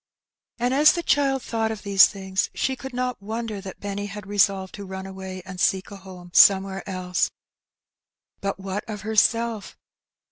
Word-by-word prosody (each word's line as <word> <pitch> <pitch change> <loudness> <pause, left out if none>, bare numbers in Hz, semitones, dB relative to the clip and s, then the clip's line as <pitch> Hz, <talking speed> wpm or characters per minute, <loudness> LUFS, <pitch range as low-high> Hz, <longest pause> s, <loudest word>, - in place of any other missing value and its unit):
And 245 +2 0
as 295 +3 +6
the 345 - -3
child 275 -3 +2
thought 225 -1 -1
of 215 -2 -7
these 195 -1 +7
things 190 -1 -2
she 265 - 0
could 265 +1 -8
not 250 -2 -3
wonder 220 0 -4
that 190 -1 -9
Benny 205 0 -4
had 205 -1 -8
resolved 195 -1 +1
to 205 - -7
run 190 0 -7
away 190 -1 -8
and 185 -1 -8
seek 190 +2 +1
a 200 - -8
home 185 -2 -12
somewhere 195 0 +5
else. 180 -1 -1 1.1
But 195 0 -3
what 195 +1 -4
of 210 -2 -5
herself? 220 0 +1
200 Hz, 170 wpm, -24 LUFS, 190-225 Hz, 1.1 s, these